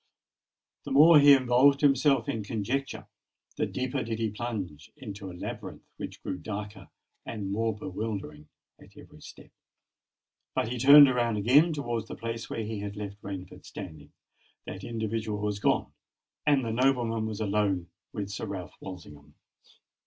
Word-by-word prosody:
The - - -7
more 150 +3 +8
he 145 0 +8
involved 130 +2 +4
himself 135 -3 +3
in 110 - -2
conjecture, 115 +6 -3 0.5
the - - -1
deeper 130 +1 -2
did 115 -2 -3
he 110 -2 -1
plunge 100 -10 -5
into 100 -7 -8
a 90 - -10
labyrinth - - -7
which - - -8
grew 90 - -4
darker 105 +1 -7 0.3
and 100 -4 -5
more 110 +1 0
bewildering 95 -7 -6 0.3
at - - -18
every - - -15
step. - - -13 1.0
When 110 - 0
he 125 - -3
turned 140 +3 +9
round 120 -3 0
again 135 +11 +5
towards 120 -7 -3
the - - -7
place 115 0 -5
where 115 - -3
he 110 0 -4
had 100 0 -5
left 105 0 -7
Rainford 95 -2 -8
standing, 80 -7 -10 0.5
that 95 +1 -7
individual 110 -2 -3
was 105 -1 -2
gone; - - +1 0.5
and 140 -4 +3
the 115 - -2
noblemen 120 -3 +1
was 110 -1 -5
alone 100 -4 0 0.2
with 100 -1 -5
Sir 105 +2 -5
Ralph 95 -3 -6
Walsingham. 75 -6 -11
110 Hz, 155 wpm, -28 LUFS, 100-125 Hz, 1.0 s, turned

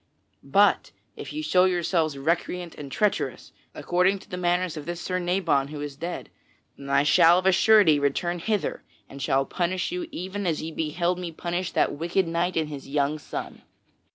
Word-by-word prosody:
But 200 +10 +3 0.3
if - - -8
ye 310 +1 -4
show 185 -10 +4
yourselves 170 -4 0
recreant 170 +4 -2
and 140 -2 -9
treacherous, 210 +8 -1 0.2
according 180 +3 +1
to 195 - -17
the - - -3
manners 180 -1 0
of 150 -2 -8
this 175 0 -4
Sir 185 +1 -2
Nabon 175 -6 +1
who 150 0 -7
is 145 -1 -5
dead, 170 +5 -6 0.4
then 140 0 -10
I 140 0 +3
shall 165 +3 +6
of 185 - -1
a 190 - +6
surety 190 -5 +5
return 175 +5 -1
hither 210 +3 -2 0.3
and 140 0 -10
shall 135 +1 +1
punish 180 - -2
you 355 -2 -3
even 190 +2 -4
as 160 -3 0
ye 160 +1 -5
beheld 170 +3 -1
me 175 -2 -5
punish 175 +2 -3
that - - +2
wicked 170 +4 0
knight 170 +2 -1
and 160 -1 +1
his 145 -2 -8
young 145 +1 0
son." - - -7
175 Hz, 185 wpm, -25 LUFS, 150-185 Hz, 0.4 s, shall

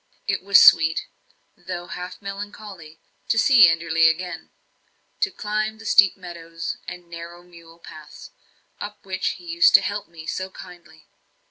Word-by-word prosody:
It - - -1
was 200 0 +5
sweet, 160 0 +5 0.5
though 175 0 -7
half 180 0 -8
melancholy, 200 -5 -9 0.3
to 225 - 0
see 225 -4 +7
Enderley 165 0 +2
again; 180 +1 -5 0.7
to 420 - +1
climb 215 - -3
the 225 - -14
steep 200 -3 +4
meadows 165 -2 -7
and 180 -1 -9
narrow 170 +1 -10
mule 170 -2 -17
paths, 155 -3 -13 0.5
up 210 0 -9
which 190 -1 -2
he 355 - -16
used 340 0 +4
to - - +7
help 205 -2 -4
me 165 -1 -13
so 185 +3 -4
kindly. 175 -4 -15
180 Hz, 145 wpm, -22 LUFS, 165-205 Hz, 0.7 s, see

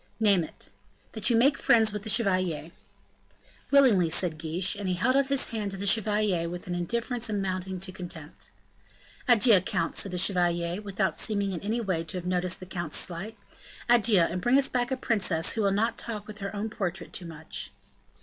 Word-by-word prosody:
"Name 200 -5 +3
it." - - -10 0.4
"That 220 0 0
you 235 - +3
make 275 +5 +3
friends 220 -2 +4
with 210 - -4
the 220 - -5
chevalier." 185 -7 +1 1.0
"Willingly," 240 - +5
said 165 -1 0
Guiche. 170 +5 +1
And 200 -1 -5
he 185 - 0
held 245 +9 +1
out 275 -1 +3
his 275 -1 +1
hand 215 -3 -3
to 195 - -7
the 200 - -4
chevalier 205 -4 +2
with 175 +1 -7
an 180 - -4
indifference 235 +7 -2
amounting 190 -2 -3
to 190 0 -3
contempt. 175 -4 -9 0.8
"Adieu, 230 -5 +6
count," 175 -2 -2
said 195 - +1
the 180 - -3
chevalier, 175 -1 +2
without 200 -2 -2
seeming 200 -3 -1
in 175 - -4
any 220 +4 -2
way 185 -6 -1
to 175 - -6
have 180 - -6
noticed 180 0 -1
the 185 - -9
count's 175 -4 -3
slight; 195 +6 -4 0.5
"adieu, 230 -5 +4
and 175 +2 0
bring 245 +7 +3
us 275 -1 +3
back 245 -1 -1
a 265 - -2
princess 190 -10 0
who 225 - -1
will 200 - +2
not 220 +4 0
talk 215 -3 -5
with 215 0 -10
her 200 +1 -5
own 210 +2 -3
portrait 190 -4 -4
too 175 - -4
much." 155 - -5
195 Hz, 200 wpm, -27 LUFS, 175-220 Hz, 1.0 s, Adieu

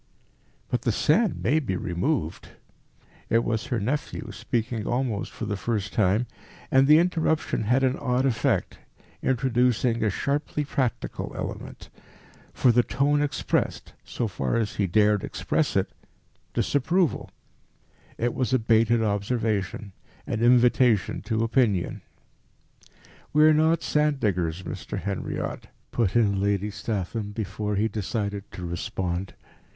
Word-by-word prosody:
"But - - 0
the - - +1
sand 90 0 +2
may 140 +11 +3
be 110 -11 -2
removed." 90 - -2 0.8
It 115 +1 +3
was 110 -2 -2
her 125 -4 -1
nephew, 130 +1 -3
speaking 115 +2 -2
almost 120 -4 -1
for 115 - -6
the 105 -1 -2
first 100 -1 -2
time, 105 +3 +2 0.5
and 135 +1 +5
the 150 +1 +8
interruption 160 -8 +1
had 125 +5 +2
an 130 0 +2
odd 125 +1 0
effect, 130 -5 0 0.4
introducing 125 -2 +1
a 110 - +3
sharply 145 +7 -1
practical 130 -4 -2
element. - - -6 0.6
For 125 - +3
the 120 +1 +5
tone 145 +4 +1
expressed, 145 -1 -1
so 120 - -3
far 70 -10 -2
as 115 -2 -1
he 100 - +1
dared 105 +2 +3
express - - -1
it, - - +1 0.6
disapproval. 165 +5 +1 0.9
It 120 +1 0
was 130 0 -1
a - - +5
baited 115 0 +3
observation, 105 -1 -1 0.3
an 115 - -2
invitation 120 -3 +4
to 110 0 0
opinion. 115 -6 +1 1.3
"We 150 +1 +5
are 155 0 +7
not 160 +2 +3
sand 150 -2 +1
diggers, 90 -5 -1
Mr. - - -5
Henriot," 100 -1 -4 0.2
put 115 -5 0
in 100 -4 +3
Lady 100 +1 0
Statham, 105 0 -3
before 105 0 -3
he 105 +3 +2
decided 100 -1 -3
to 90 - -6
respond. 90 0 -3
115 Hz, 130 wpm, -26 LUFS, 100-130 Hz, 1.3 s, the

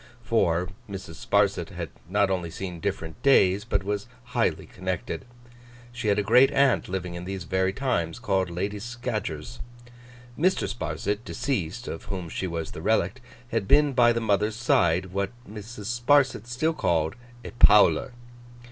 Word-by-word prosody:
For, 90 -7 +1 0.2
Mrs. 95 -4 -8
Sparsit - - +2
had - - -6 0.2
not 100 0 +2
only 90 -3 -1
seen 90 0 -6
different 80 +5 -4
days, 100 -8 +4
but 100 -3 -1
was 105 +2 -3 0.2
highly 125 0 -1
connected. 95 +7 -4 0.7
She 120 -2 -4
had 100 - +3
a 105 - +1
great 125 +6 +6
aunt 140 -7 +2
living 90 -2 -3
in 85 0 -6
these 95 -1 -4
very 95 +3 0
times 95 -9 -1
called 95 -6 0
Lady 100 +4 -3
Scadgers. 110 - -5 0.8
Mr. 185 +5 +1
Sparsit, 100 +4 -3
deceased, 120 - -3
of 80 - -6
whom 90 -4 -5
she 95 - -3
was 85 -2 -4
the - - -8
relict, - - +1 0.3
had 110 -4 -1
been 145 +2 +4
by 120 -2 +5
the 115 - 0
mother's 105 -1 +1
side 95 -6 +2
what 100 0 0 0.2
Mrs. 110 +2 -6
Sparsit 135 -4 +3
still 140 +7 0
called 80 - 0 0.3
'a - - -6
Powler. 105 +3 +6
100 Hz, 155 wpm, -26 LUFS, 90-120 Hz, 0.8 s, great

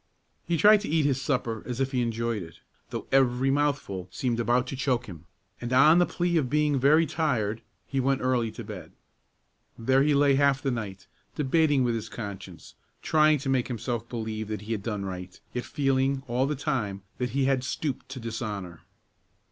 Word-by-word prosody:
He 170 0 +1
tried 210 +4 +6
to - - -5
eat 155 -1 +2
his 135 -2 +1
supper 120 -5 -1
as 125 0 -4
if 135 0 0
he 125 -2 +1
enjoyed 115 -2 -1
it, 80 -2 -11 0.3
though - - -5
every 130 0 +3
mouthful 140 -10 -1
seemed 120 +5 -2
about 120 +2 +2
to - - -4
choke 130 -2 0
him, 85 -6 -11 0.4
and 120 0 -4
on 150 +6 +6
the 175 - +4
plea 175 -1 0
of 135 -6 0
being 150 -1 +2
very 155 +5 +5
tired, 120 -10 -1 0.2
he 135 - -2
went 135 +1 +1
early 125 -3 +1
to - - -7
bed. - - -9 0.8
There 130 +3 +3
he 145 +1 +3
lay 140 0 +4
half 140 0 +3
the 135 -1 -1
night 100 -5 -5 0.3
debating 145 -1 +2
with 120 -1 +1
his 115 -1 -4
conscience, 95 -6 -8 0.3
trying 155 -1 +4
to 135 0 -4
make 130 -2 +1
himself 120 -1 -4
believe 110 -2 -4
that 105 -1 -4
he 105 +2 -7
had 110 -3 -1
done 105 -2 -3
right, 90 -1 -7
yet 125 - -3
feeling 135 -1 0
all 125 +3 +1
the 150 - -1
time 110 -9 -2 0.2
that 125 -1 -1
he 135 - +3
had 135 -2 +1
stooped 130 -1 -3
to 130 0 -6
dishonor. 105 -7 -5
125 Hz, 195 wpm, -27 LUFS, 115-140 Hz, 0.8 s, tried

